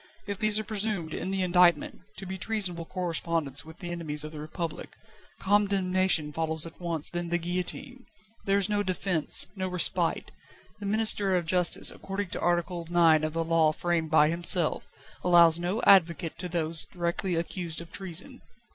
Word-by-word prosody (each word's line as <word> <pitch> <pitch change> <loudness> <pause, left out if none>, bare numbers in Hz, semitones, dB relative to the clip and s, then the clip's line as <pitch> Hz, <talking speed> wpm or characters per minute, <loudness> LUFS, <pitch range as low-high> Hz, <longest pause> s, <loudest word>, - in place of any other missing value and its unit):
If 200 -1 -5
these 215 -1 +2
are 215 - -1
presumed, 205 -6 -3
in 185 - -4
the 190 -1 -1
indictment, 175 -3 +3 0.2
to 195 - -7
be 190 0 -6
treasonable 185 -7 -2
correspondence 165 -5 -2
with 160 +1 -13
the 175 -1 -6
enemies 155 -4 -3
of 155 - -7
the 155 - -9
Republic, 155 +1 -6 0.4
condemnation 190 -5 +2
follows 160 0 0
at 165 - -11
once, 165 -3 -1
then 175 -1 -3
the 175 - +1
guillotine. 180 +9 -5 0.4
There 195 0 +2
is 195 -1 +2
no 205 -1 0
defence, 185 -4 0
no 190 -1 -3
respite. 180 -1 -1 0.5
The 205 - -5
Minister 210 -2 +2
of 175 -2 0
Justice, 180 +1 +1
according 195 0 -5
to - - -2
Article 175 0 0
IX 165 -3 +4
of 155 0 -2
the 165 0 0
Law 165 -1 +3
framed 170 -1 -1
by 155 -1 +5
himself, 170 0 +1 0.4
allows 170 -2 +6
no 180 +6 -2
advocate 170 -4 +4
to 180 0 -5
those 165 -2 +1
directly 175 0 -2
accused 170 0 -4
of 170 0 -11
treason. 195 - -6
175 Hz, 170 wpm, -28 LUFS, 165-190 Hz, 0.5 s, allows